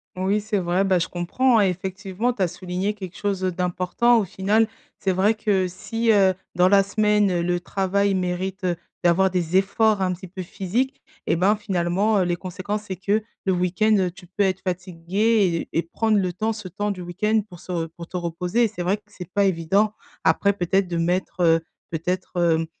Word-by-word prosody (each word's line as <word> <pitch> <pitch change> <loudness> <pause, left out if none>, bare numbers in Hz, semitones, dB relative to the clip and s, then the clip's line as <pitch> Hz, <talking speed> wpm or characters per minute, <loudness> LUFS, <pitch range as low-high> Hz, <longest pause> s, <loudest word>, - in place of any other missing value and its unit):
Oui, 190 +3 0
c'est 210 -1 -1
vrai. 180 +1 +1
Bah, 190 -2 +3
je 170 - -1
comprends, 230 +8 +1
hein, - - +5
effectivement, 190 +5 -2
tu 215 - -6
as - - +3
souligné 180 +3 -3
quelque 190 -4 -9
chose 200 -2 -1
d'important, 185 +6 +1
au 210 - 0
final. 205 +5 +1 0.3
C'est 195 - +1
vrai 190 +4 +3
que 205 -4 +1
si, 225 +5 -1
heu, 195 -3 +4 0.2
dans 180 +1 +4
la 195 0 +6
semaine, 210 -2 +2
le 175 +1 0
travail 195 +2 0
mérite 185 +1 -2 0.4
d'avoir 180 +2 +4
des 180 -1 +1
efforts 205 +2 +2
un 185 -1 +1
petit 185 +1 -9
peu 185 +1 -7
physiques 230 - -2 0.2
et - - +2
ben, 190 +5 +3
finalement, 200 0 +1
heu, - - +3
les 175 0 0
conséquences, 185 +4 -4
c'est 195 -3 -5
que 200 +4 0 0.2
le 190 - +2
week-end, 185 +2 +2
tu 185 -2 -14
peux 190 +3 0
être 190 -1 0
fatigué 185 +1 0
et - - +2
et - - +3
prendre 215 +5 +1
le 185 -2 0
temps, 215 +6 -1
ce 210 -3 -8
temps 205 +3 -2
du 185 -2 -6
week-end 210 +5 0
pour 175 -2 -12
se 170 -3 -3
pour 170 +1 -11
te - - -11
reposer, 180 +6 0
et - - +2
c'est 200 -4 -6
vrai 190 +4 +1
que 210 - -27
c'est 185 -4 -10
pas 200 -1 +3
évident. 195 +4 +2 0.3
Après, 200 0 +3
peut-être 190 0 +1
de 170 -1 -3
mettre, 180 +2 -1
heu, 165 -1 +4 0.3
peut-être, 180 +3 -3
hem, 165 -2 +2
190 Hz, 200 wpm, -23 LUFS, 180-205 Hz, 0.4 s, la